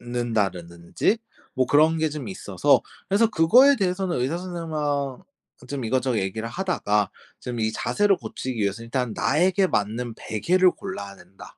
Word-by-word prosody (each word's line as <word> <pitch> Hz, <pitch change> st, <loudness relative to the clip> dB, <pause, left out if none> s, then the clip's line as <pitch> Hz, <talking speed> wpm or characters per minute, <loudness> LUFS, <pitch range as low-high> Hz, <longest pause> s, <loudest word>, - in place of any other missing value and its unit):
눕는다라든지 105 Hz, -, -1 dB, 0.4 s
뭐 130 Hz, -1 st, +1 dB
그런 155 Hz, +4 st, +4 dB
게 160 Hz, 0 st, +1 dB
좀 145 Hz, -7 st, -6 dB
있어서 95 Hz, -, +2 dB, 0.3 s
그래서 210 Hz, +3 st, +3 dB
그거에 245 Hz, +10 st, +5 dB
대해서는 185 Hz, -2 st, -1 dB
의사 145 Hz, +7 st, -1 dB
선생님 175 Hz, -3 st, -6 dB
하 140 Hz, -3 st, -1 dB, 0.5 s
좀 135 Hz, -4 st, -4 dB
이것저것 125 Hz, 0 st, 0 dB
얘기를 100 Hz, +4 st, -3 dB
하다가 115 Hz, -, 0 dB, 0.3 s
좀 120 Hz, -1 st, -5 dB
이 110 Hz, 0 st, 0 dB
자세를 205 Hz, -2 st, +1 dB
고치기 130 Hz, -7 st, -5 dB
위해서 100 Hz, +3 st, -1 dB
일단 120 Hz, -1 st, -2 dB
나에게 185 Hz, +6 st, +2 dB
맞는 110 Hz, -, -1 dB
베개를 180 Hz, -, +2 dB
골라야 100 Hz, -, -7 dB
된다. 95 Hz, +2 st, -15 dB
130 Hz, 345 characters per minute, -24 LUFS, 110-180 Hz, 0.5 s, 그거에